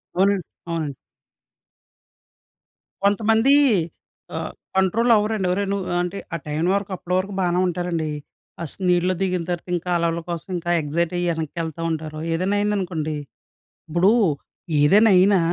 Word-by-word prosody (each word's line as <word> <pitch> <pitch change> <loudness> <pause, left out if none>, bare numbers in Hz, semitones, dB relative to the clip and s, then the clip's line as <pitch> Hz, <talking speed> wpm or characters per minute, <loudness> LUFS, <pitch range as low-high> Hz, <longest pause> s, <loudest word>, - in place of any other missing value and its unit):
అవునండి. 195 0 +2 0.2
అవునండి. 160 -4 -3 2.1
కొంతమంది 220 +5 +4 0.8
ఆహ్, - - -4 0.3
కంట్రోల్ 225 +6 +3
అవ్వరండి 210 -2 +1
ఒరేయ్! 195 +2 -1
నువ్ 200 -2 -2 0.2
అంటే 180 +2 -3 0.2
ఆ - - 0
టయనివరకు 180 +7 0
అప్పటి 180 0 -5
వరకు 195 +2 -2
బానే 180 -1 +1
ఉంటారండి. 175 -3 -2 0.5
ఆస్ 155 - -7
నీళ్ళలో 180 +1 +3
దిగిన 180 -3 0
తర్వాత 175 0 -4
ఇంకా 175 +1 -4
అలల 170 0 0
కోసం 170 +2 -5
ఇంకా 175 0 -2
ఎక్సైట్ 160 +4 -1
అయ్యి 175 - 0
ఎనక్కేళ్తా 160 +1 -4
ఉంటారు. 155 -1 -4
ఏదైనా 185 +5 0
అయిందనుకోండి 180 -7 -1 0.7
ఇప్పుడు 175 +6 +4 0.7
ఏదైనా 205 +8 +6
అయినా 195 +1 +5
180 Hz, 125 wpm, -22 LUFS, 165-200 Hz, 2.1 s, ఏదైనా